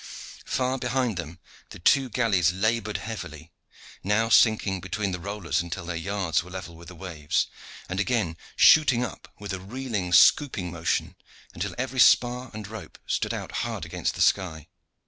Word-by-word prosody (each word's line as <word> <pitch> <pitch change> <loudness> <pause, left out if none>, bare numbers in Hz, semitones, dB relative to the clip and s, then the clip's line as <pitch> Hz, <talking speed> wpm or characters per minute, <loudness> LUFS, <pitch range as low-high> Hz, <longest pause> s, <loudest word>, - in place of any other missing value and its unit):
Far 130 0 0
behind 125 -2 0
them 85 -1 -6 0.3
the - - -10
two 130 +9 +3
galleys 105 -8 +2
labored 110 +2 0
heavily, 80 -8 -7 0.5
now 105 +4 +1
sinking 105 -4 +4
between 100 +2 -2
the 90 - -4
rollers 100 -1 -2
until 85 +1 -6
their 85 0 -4
yards 90 -1 -1
were 90 - -12
level 90 -2 -8
with 85 +1 -13
the 90 - -11
waves, 80 -4 -1 0.4
and 95 +1 -3
again 100 -6 0 0.2
shooting 135 -6 +6
up - - -10
with 100 -1 -6
a 95 - -4
reeling, 105 -2 -4
scooping 95 -2 +4
motion 85 0 -2 0.4
until - - -4
every 130 +1 -3
spar 125 +1 +4
and 105 -1 -7
rope 110 +1 -9
stood - - -1
out - - -5
hard - - -4
against - - -3
the - - +2
sky. 80 -5 0
100 Hz, 165 wpm, -26 LUFS, 85-115 Hz, 0.5 s, shooting